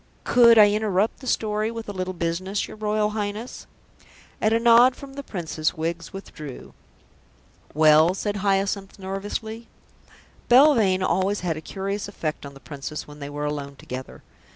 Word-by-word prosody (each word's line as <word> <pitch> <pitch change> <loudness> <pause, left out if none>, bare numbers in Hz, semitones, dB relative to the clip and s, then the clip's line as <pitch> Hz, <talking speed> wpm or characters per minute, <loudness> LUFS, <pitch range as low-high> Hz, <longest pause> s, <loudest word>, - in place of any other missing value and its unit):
"Could 235 -2 +6
I 205 -1 +8
interrupt 210 -1 0
the 260 - -10
story 215 -1 0
with 230 -1 -7
a 205 - -5
little 185 -1 -4
business, 175 +4 -2
your - - -10
Royal 210 0 0
Highness?" 210 +3 -5 0.7
At 215 - +2
a 225 - +3
nod 240 +2 +6
from 275 -2 -11
the 280 - -6
Princess, 170 - -3
Wiggs 165 +1 -3
withdrew. 155 -8 -9 1.0
"Well?" 155 +3 +5
said 205 +1 -2
Hyacinth 195 0 -1
nervously. 205 +4 -5 0.8
Belvane 240 -8 +5
had 185 - +1
always 190 +2 0
a 165 -3 -2
curious 195 +4 -4
effect 155 -7 -5
on 140 - -12
the - - -12
Princess 145 +1 -7
when 150 0 -12
they 140 -1 -6
were 145 0 -4
alone 145 -1 -4
together. 130 -1 -8
195 Hz, 155 wpm, -24 LUFS, 160-215 Hz, 1.0 s, I